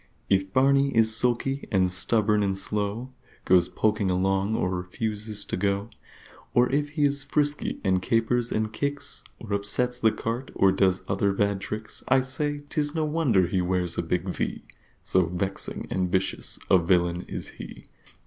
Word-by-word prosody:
If 95 0 +2
Barney 140 +3 +4
is 110 -1 +5
sulky 125 +4 0
and 95 -3 +2
stubborn 105 +3 +3
and 95 -1 0
slow, 105 +6 -3 0.3
Goes 90 -1 +4
poking 105 -2 0
along 95 +3 +1
or 90 - 0
refuses 105 +4 -3
to - - -3
go, 100 +2 -1 0.6
Or 125 +1 +4
if 145 +1 0
he 150 -1 0
is 140 0 +1
frisky 145 +1 -1
and 95 -2 +2
capers 115 +3 +1
and 110 0 -1
kicks, 140 0 -3 0.2
Or 105 -3 -6
upsets 125 +5 0
the 110 -2 +4
cart, 115 +5 -4
or 95 - +4
does 95 -1 +2
other 100 +1 +1
bad 100 0 0
tricks, 105 +2 -5
I 130 0 +4
say 145 +2 -3
'tis 145 0 -1
no 160 -1 +1
wonder 150 - +2
he 90 +2 0
wears 90 -1 -1
a - - 0
big 85 +2 -2
V, 90 - -3 0.4
So 90 -2 +2
Vexing 95 +3 -3
and 90 -1 -1
Vicious 95 0 0
a 95 - +5
Villain 85 0 +1
is - - -5
he! - - -11
105 Hz, 170 wpm, -26 LUFS, 95-125 Hz, 0.6 s, is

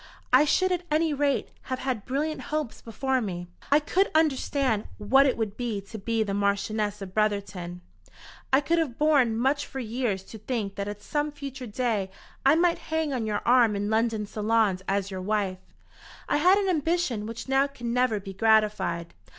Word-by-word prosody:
I 300 - +7
should 370 +5 +2
at 360 -1 0
any 310 +1 +2
rate 285 -1 0 0.2
have 260 - -1
had 255 -5 -3
brilliant 300 +4 -1
hopes 305 -6 -3
before 260 +3 -1
me. 175 -5 -4 0.3
I 290 - +7
could 370 +6 +1
understand 275 -7 +1
what 270 +7 +4
it 260 - 0
would 215 -3 -2
be 235 -4 -2
to 200 +3 -9
be 225 +2 0
the 200 -2 -3
Marchioness 205 +1 -1
of 185 -1 -9
Brotherton. 200 -4 -1 0.7
I 265 +2 +5
could 335 +4 +1
have 280 -8 -2
borne 280 -7 +3
much 275 +4 +1
for 270 - -6
years 230 -5 -2
to 220 - -11
think 215 -3 -3
that 200 0 -4
at 205 0 -7
some 295 +4 -1
future 275 -3 -7
day 215 -3 -1 0.3
I 275 +3 +6
might 340 +1 +2
hang 320 -2 0
on 235 -4 -2
your 205 -1 -2
arm 240 -3 +5
in 205 +1 -2
London 220 -1 +1
salons 215 -2 +1
as 195 0 -1
your 190 -1 -4
wife. 195 -2 -1 0.7
I - - +2
had 365 +6 +5
an 405 -1 0
ambition 320 - 0
which 230 +3 -7
now 270 +1 +3
can 240 -4 -5
never 250 -4 +2
be 195 -1 -8
gratified. 210 -5 +2
230 Hz, 185 wpm, -27 LUFS, 205-280 Hz, 0.7 s, I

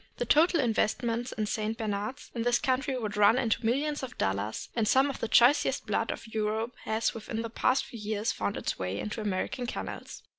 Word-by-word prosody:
The 245 - -1
total 330 +6 +4
investments 235 0 0
in 215 - -2
St. 215 +1 -2
Bernards 215 +5 -4
in 235 - -3
this 240 +1 +3
country 260 0 0
would 215 -3 -3
run 210 +3 +5
into 240 -2 +1
millions 285 +6 0
of 255 -2 -7
dollars, 100 +3 -2
and 225 -2 +1
some 270 +4 +4
of - - -9
the - - -2
choicest 245 +6 +4
blood - - 0
of - - -4
Europe 220 +1 -2
has 220 +1 0
within 225 0 -4
the 230 - -5
past 255 +3 +2
few 235 - -9
years 215 +1 -1
found 200 - -2
its - - -3
way 95 +1 -2
into 215 +1 -4
American 210 +5 -2
kennels. - - -6
225 Hz, 200 wpm, -29 LUFS, 215-255 Hz, -, run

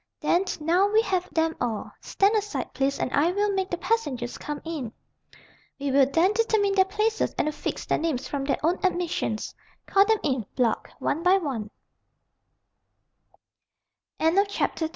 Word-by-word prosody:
"Then 355 +3 +2
now 345 +6 +3
we 430 +2 +3
have 370 -3 -1
them 320 0 +1
all. 230 -4 -2
Stand 395 +2 +2
aside, 420 -1 -2
please, 270 +2 0
and - - -2
I 315 +5 +3
will 410 +2 +1
make 380 -1 -1
the 350 - -2
passengers 285 - -1
come 295 -1 -5
in. 300 -9 -4 0.9
We 280 0 -1
will 270 0 +5
then 340 +8 +3
determine 430 -2 +2
their 380 -1 +4
places 425 +3 -1
and - - +1
affix 305 - -4
their - - 0
names 310 -6 -2
from 280 -1 -3
their 275 - +1
own 345 +3 +2
admissions. 350 - -1 0.3
Call 395 0 +4
them 440 +1 +3
in, 260 -7 -1
Block, 240 -4 0
one 315 - -1
by 365 +2 +5
one." 260 - -3
340 Hz, 150 wpm, -26 LUFS, 275-395 Hz, 0.9 s, will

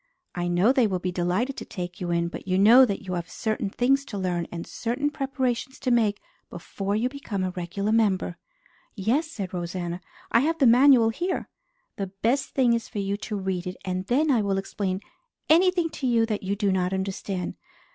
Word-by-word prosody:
"I 175 0 -2
know 175 +7 +3
they 260 -4 +3
will 190 -3 -1
be 180 0 -3
delighted 180 +10 -1
to - - -5
take 180 -2 -7
you 175 - -2
in; 170 0 +1
but 170 - -8
you 185 0 +1
know 230 +7 +8
that 200 -4 -3
you 185 -1 -5
have 175 -1 -4
certain 215 -2 -2
things 270 +6 +2
to 210 - -6
learn 180 -3 -1
and 170 -1 -5
certain 255 +6 -2
preparations 265 -2 -2
to 255 - -1
make 220 -4 +2 0.3
before 200 +1 -4
you 225 +4 +1
become 255 -8 -4
a 185 - -1
regular 185 +4 -3
member." 200 -5 +1 0.6
"Yes," 235 - +1
said 195 - -6
Rosanna. 175 0 -4 0.3
"I - - +5
have 320 +6 +1
the 275 - +3
manual 245 -1 +6
here." 350 +11 -3 0.5
"The 195 - -2
best 230 +8 -1
thing 250 -3 +4
is 230 -1 -2
for - - -8
you 200 0 -1
to 210 +1 -5
read 190 -2 -2
it 180 - -5
and 185 0 -3
then 290 +5 +2
I 240 -5 +3
will 200 -1 0
explain 195 -1 -3 0.5
anything 350 0 +4
to 265 - -3
you 230 -2 +3
that 215 -2 -2
you 195 +1 -2
do 205 -1 +1
not 185 0 0
understand. 190 -1 -3
205 Hz, 205 wpm, -26 LUFS, 185-250 Hz, 0.6 s, know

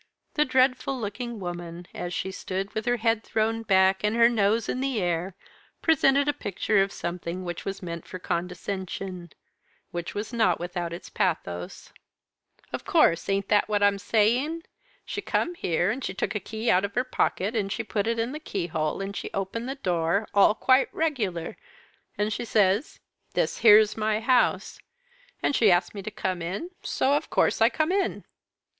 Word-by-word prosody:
The 300 - +3
dreadful 260 0 +2
looking 235 +2 -5
woman, 175 -1 -6
as 175 - -5
she 190 +1 -3
stood 190 +1 -4
with 220 +2 -3
her 245 0 +2
head 225 -1 +1
thrown 225 +1 0
back, 190 -2 +3
and 210 +1 +1
her 235 0 +6
nose 220 0 +1
in 255 - -2
the 265 -4 0
air, 175 0 -1 0.5
presented 280 -3 +4
a 290 - +2
picture 205 -5 0
of 195 0 0
something 175 +1 -5
which 175 -1 -5
was 195 -1 -5
meant 170 -2 -6
for 185 - -6
condescension, 180 0 -4 0.6
which 170 -1 -5
was 210 +3 -4
not 230 -2 +2
without 175 -1 -4
its 170 - -8
pathos. 90 - -3 0.8
"Of - - -4
course! 170 +3 +3
ain't 195 0 0
that 210 0 +3
what 205 -1 +1
I'm 200 -1 +3
saying? 245 +11 +1 0.4
She - - -4
come 350 - -1
here, 175 - 0
and 255 +4 -4
she 190 - -3
took - - -2
a 210 - -1
key 220 +4 -1
out 185 +2 +3
of 200 0 -4
her 250 - +2
pocket, 225 -4 -1
and 200 -3 -1
she 225 - -2
put 205 0 -2
it 230 0 0
in 230 +2 -1
the 305 - -5
keyhole, 170 - -2
and 195 +1 -5
she - - -4
opened 215 +6 -3
the 270 - -3
door, 180 -3 0
all 205 +1 +5
quite 260 +4 +3
regular, 215 - -2 0.6
and 210 +1 0
she - - -3
says, 210 - +1 0.4
'This - - 0
here's 215 -1 +7
my 215 0 0
house,' 250 +2 +1 0.6
and 285 - +2
she 220 - +5
asked 175 -1 +2
me 200 - -6
to 195 - -5
come 190 -4 -3
in, 195 - -4
so 270 - +1
of 290 - 0
course - - +2
I - - +7
come 310 +2 0
in." 390 0 0
205 Hz, 185 wpm, -26 LUFS, 185-235 Hz, 0.8 s, here's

